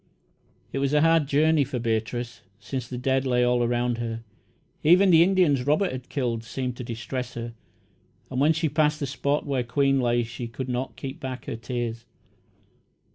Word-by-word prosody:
It 135 - -1
was 140 +1 0
a 150 - +5
hard 165 -2 +4
journey 150 +1 +3
for 135 -1 -4
Beatrice, 115 +1 -2 0.2
since 120 +4 -5
the 125 - -6
dead 130 +1 +1
lay 125 -2 +2
all 125 0 +2
around 120 0 0
her. 115 -1 -4 0.6
Even 185 +4 +6
the 165 -1 +7
Indians 170 -8 +3
Robert 175 +6 +2
had 130 -1 -7
killed 120 -5 -2
seemed 125 +2 -4
to 125 - -5
distress 120 +1 -5
her, 115 0 -5 0.8
and 130 0 -1
when 150 +3 +5
she 160 +1 0
passed 150 +1 +1
the 140 - -1
spot 140 +2 -1
where 135 -3 0
Queen 135 +3 +2
lay 120 -1 +2
she 120 +1 -6
could 130 +3 -6
not 125 +1 -3
keep 135 0 -7
back 130 -2 -6
her - - -4
tears. 115 0 -4
130 Hz, 185 wpm, -25 LUFS, 120-145 Hz, 0.8 s, the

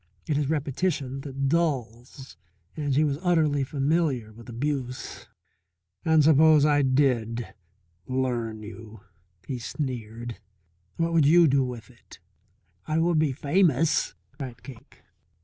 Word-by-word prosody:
It 150 - 0
is 145 -1 0
repetition 145 -2 -2
that 135 -1 -3
dulls, 135 -5 -2 0.4
and 145 -3 -1
she 150 - +4
was 145 -1 -1
utterly 155 -6 +2
familiar 135 -5 -1
with 115 +2 -13
abuse. 130 +1 -4 0.8
"And 160 -1 +4
suppose 155 0 +6
I 145 -1 +3
did 125 -4 +1 0.5
'learn' 120 -4 -2
you," 110 -1 -11 0.4
he 125 +1 -4
sneered, 120 -3 -5 0.6
"what 165 0 0
would 160 -4 +4
you 170 +2 +6
do 140 -1 +3
with 120 -4 -7
it?" - - -17 0.7
"I 155 - 0
would 165 -1 +2
be 155 -3 +2
famous," 155 +2 +1 0.2
cried 135 -4 -9
Cake. 130 -5 -14
140 Hz, 125 wpm, -26 LUFS, 125-155 Hz, 0.8 s, suppose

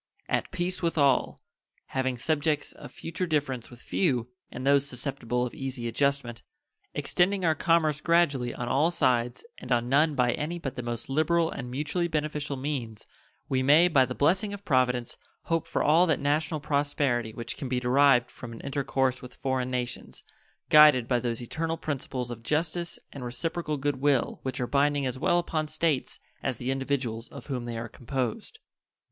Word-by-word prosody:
At - - 0
peace 180 0 -2
with 170 -1 -1
all; 140 -3 +2 0.5
having 130 -1 -1
subjects 150 +3 0
of - - -12
future 180 +2 -4
difference 140 -6 -1
with 120 - -13
few, 125 -10 0 0.2
and 125 - -6
those 140 0 +4
susceptible 125 -2 -2
of 120 - -6
easy 130 -3 -4
adjustment; 125 -2 0 0.5
extending 185 +1 +1
our 160 - +4
commerce 155 -1 +2
gradually 145 -8 +2
on 120 - -5
all 140 +6 +3
sides 125 - 0
and 125 - -9
on 120 0 +2
none 150 +3 +3
by 125 -2 +3
any 155 +7 -3
but 135 -5 -5
the 125 - -3
most 120 0 -4
liberal 160 +4 +2
and 125 -2 -6
mutually 150 +7 -1
beneficial 150 -3 -2
means, 130 -6 -4 0.4
we 130 -1 +1
may, 150 +6 +6
by 145 -7 +5
the 125 0 -3
blessing 190 +8 +2
of 200 0 -14
Providence, 125 -4 +1 0.3
hope 165 -1 -1
for - - 0
all 165 +4 +5
that 160 - +2
national 155 +2 0
prosperity 140 -5 0
which 115 +1 -5
can 135 -5 -5
be 125 -1 +1
derived 125 0 +4
from 120 -2 -9
an 115 - -9
intercourse 135 -2 0
with 125 0 -11
foreign 130 -1 -1
nations, 125 -1 -4 0.5
guided 150 -6 +8
by 125 -1 +2
those 120 0 -3
eternal 165 +6 -2
principles 130 -5 -4
of 115 -1 -7
justice 160 +6 -1 0.2
and 140 - -7
reciprocal 155 +5 -2
good 145 0 -1
will 135 -2 +1
which 130 -1 -4
are 125 - 0
binding 145 +1 +2
as 130 0 -3
well 175 +5 +3
upon 160 -3 -1
States 155 -2 -1 0.2
as 130 -4 -2
the 125 +2 -2
individuals 135 -4 -2
of 140 -4 -11
whom 125 -4 -4
they 120 -1 -4
are 115 +1 -4
composed. 135 - -4
140 Hz, 175 wpm, -28 LUFS, 125-155 Hz, 0.5 s, guided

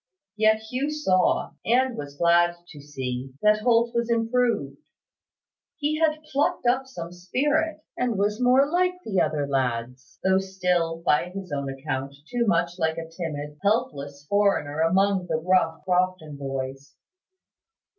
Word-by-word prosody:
Yet 220 0 +3
Hugh 255 +6 -2
saw, 195 -12 +1
and 250 +2 +2
was 145 -1 -7
glad 175 +1 +4
to 145 - -11
see, 130 -2 -5
that 210 0 +5
Holt 235 0 +3
was 235 0 0
improved. 230 - 0 1.0
He 305 0 -1
had 310 -1 +1
plucked 305 +1 -1
up 255 +2 +2
some 170 -10 -7
spirit, 295 - -1
and 245 -4 -1
was 210 +3 0
more 255 +3 +5
like 360 +3 +1 0.3
other 150 -2 0
lads, 125 -1 -3
though 190 0 +4
still, 180 -4 -1
by 150 +4 +2
his 190 -2 -8
own 140 -1 -2
account, 135 0 -4
too 240 +2 -1
much 170 -1 +1
like 160 -1 0
a 165 0 -5
timid, 150 -3 -5
helpless 145 - -1
foreigner 195 -7 +1
among 190 +3 +2
the 160 - 0
rough 165 -2 +1
Crofton 180 -4 0
boys. 135 0 -5
185 Hz, 140 wpm, -25 LUFS, 145-235 Hz, 1.0 s, that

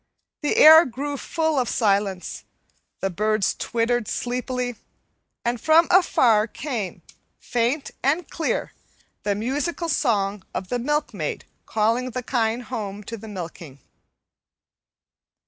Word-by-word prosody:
The 295 - 0
air 320 +2 +10
grew 280 +4 -4
full 315 +1 0
of 245 - 0
silence, 200 -4 0 0.6
the 195 - -1
birds 215 +2 +1
twittered 235 -1 -1
sleepily, 250 0 -2 0.7
and 235 -1 -1
from 320 +1 +5
afar 235 - +4
came, 235 -7 -5 0.3
faint 245 +4 -1
and 310 +5 +1
clear, 325 - -2 0.5
the 205 -1 0
musical 290 - -2
song 205 -9 0
of 185 - -4
the 245 - -1
milkmaid 295 +4 -2 0.2
calling 230 +4 +1
the 255 +1 -4
kine 235 -1 0
home 210 -4 -5
to 230 - -6
the 220 0 -10
milking. 170 -7 -8
240 Hz, 115 wpm, -23 LUFS, 210-280 Hz, 0.7 s, air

